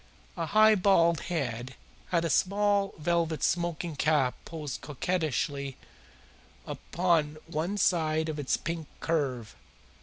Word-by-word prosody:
A 165 Hz, -3 st, -3 dB
high 215 Hz, +4 st, +6 dB
bald 175 Hz, -5 st, +4 dB
head 130 Hz, -6 st, -3 dB, 0.3 s
had 170 Hz, -2 st, +1 dB
a -, -, 0 dB
small 200 Hz, +3 st, +2 dB
velvet 165 Hz, 0 st, 0 dB
smoking 170 Hz, -2 st, -1 dB
cap 145 Hz, -3 st, +2 dB
poised 150 Hz, -5 st, -6 dB
coquettishly 145 Hz, -3 st, -2 dB, 0.9 s
upon 165 Hz, -4 st, 0 dB
one 170 Hz, +5 st, -2 dB
side 160 Hz, -4 st, +2 dB
of 155 Hz, -1 st, -4 dB
its 140 Hz, -, 0 dB
pink 165 Hz, -1 st, -4 dB
curve. 130 Hz, -9 st, -1 dB
165 Hz, 115 wpm, -29 LUFS, 150-175 Hz, 0.9 s, high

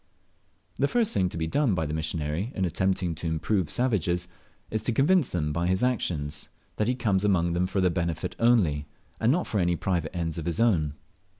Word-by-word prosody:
The 140 Hz, -, +2 dB
first 230 Hz, +5 st, +2 dB
thing 95 Hz, -3 st, +2 dB
to -, -, -7 dB
be 80 Hz, -, -1 dB
done 115 Hz, -, +1 dB
by 80 Hz, -, -1 dB
the 75 Hz, -, -4 dB
missionary 80 Hz, -, -2 dB
in 95 Hz, -, 0 dB
attempting 90 Hz, 0 st, 0 dB
to 80 Hz, +1 st, -5 dB
improve 80 Hz, +3 st, 0 dB
savages, 90 Hz, -8 st, 0 dB, 0.4 s
is 110 Hz, -, -1 dB
to 120 Hz, -, 0 dB
convince 145 Hz, +5 st, +3 dB
them 75 Hz, -4 st, -1 dB
by 85 Hz, +2 st, 0 dB
his 95 Hz, +5 st, +1 dB
actions 80 Hz, -, -1 dB, 0.3 s
that 105 Hz, -, +1 dB
lie 125 Hz, -, +1 dB
comes 100 Hz, -6 st, +1 dB
among 85 Hz, -4 st, +2 dB
them 90 Hz, +1 st, +1 dB
for 95 Hz, +1 st, -1 dB
their 90 Hz, -1 st, +3 dB
benefit 85 Hz, -2 st, -2 dB
only, 90 Hz, -12 st, +3 dB, 0.3 s
and 115 Hz, +2 st, +3 dB
not 175 Hz, +5 st, +1 dB
for 105 Hz, -, -1 dB
any 85 Hz, -1 st, +2 dB
private 85 Hz, -2 st, -2 dB
ends 85 Hz, -1 st, -2 dB
of 80 Hz, -, -5 dB
his 85 Hz, -, -2 dB
own. 80 Hz, -11 st, +2 dB
90 Hz, 205 wpm, -27 LUFS, 80-110 Hz, 0.4 s, convince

